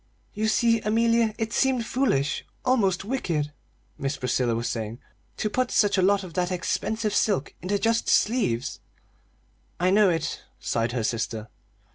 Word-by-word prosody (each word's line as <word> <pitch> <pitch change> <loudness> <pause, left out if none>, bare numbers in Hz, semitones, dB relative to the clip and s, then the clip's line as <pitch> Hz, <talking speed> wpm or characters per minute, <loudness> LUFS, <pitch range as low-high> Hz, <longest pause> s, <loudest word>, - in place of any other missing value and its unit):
"You 215 +1 -1
see, 230 +1 +3
Amelia, 230 0 +2
it 225 -1 -3
seemed 260 -2 +2
foolish 230 - 0 0.2
almost 200 -8 +2
wicked," 170 - -1 0.5
Miss 140 +1 -2
Priscilla 125 -2 0
was 115 +1 -2
saying, 110 0 -3 0.4
"to - - -1
put 250 +4 0
such 205 -1 +3
a 190 - +2
lot 200 +1 +3
of 180 -3 -9
that 180 0 0
expensive 215 +4 -1
silk 195 -9 +1
into 190 +4 0
just 230 +3 +1
sleeves." 205 - +1 1.0
"I 180 +1 +3
know 205 0 +5
it," 165 -3 -2 0.2
sighed 115 +1 -1
her 120 -3 -1
sister. 110 -1 -2
195 Hz, 150 wpm, -26 LUFS, 140-225 Hz, 1.0 s, know